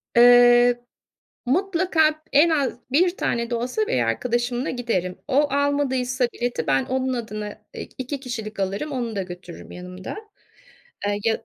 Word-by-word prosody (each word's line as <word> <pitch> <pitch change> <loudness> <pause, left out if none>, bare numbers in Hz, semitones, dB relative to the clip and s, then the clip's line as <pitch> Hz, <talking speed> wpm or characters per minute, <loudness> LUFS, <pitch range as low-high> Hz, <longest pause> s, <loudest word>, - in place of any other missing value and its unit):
Eee, 245 0 +7 0.6
mutlaka 325 0 +2
en 300 +4 +5
az 280 -6 0
1 350 +6 +3
tane 235 0 -1
de 240 - -1
olsa 230 -2 -1
bir 130 - +1
arkadaşımla 240 - -1
giderim. 205 -8 -2
O, 290 +1 +3
almadıysa 265 -3 +1
bileti 245 0 -3
ben 135 -1 +2
onun 260 0 -1
adına, 215 -3 -4 0.3
eee, - - -7
2 265 +2 -4
kişilik 225 -5 -6
alırım, 195 +10 -2
onu 240 -5 -3
da 195 - -1
götürürüm 175 -1 -10
yanımda. 180 +1 -8 0.9
Eee, 205 0 0
ya 225 -1 0
245 Hz, 140 wpm, -23 LUFS, 215-280 Hz, 0.9 s, Eee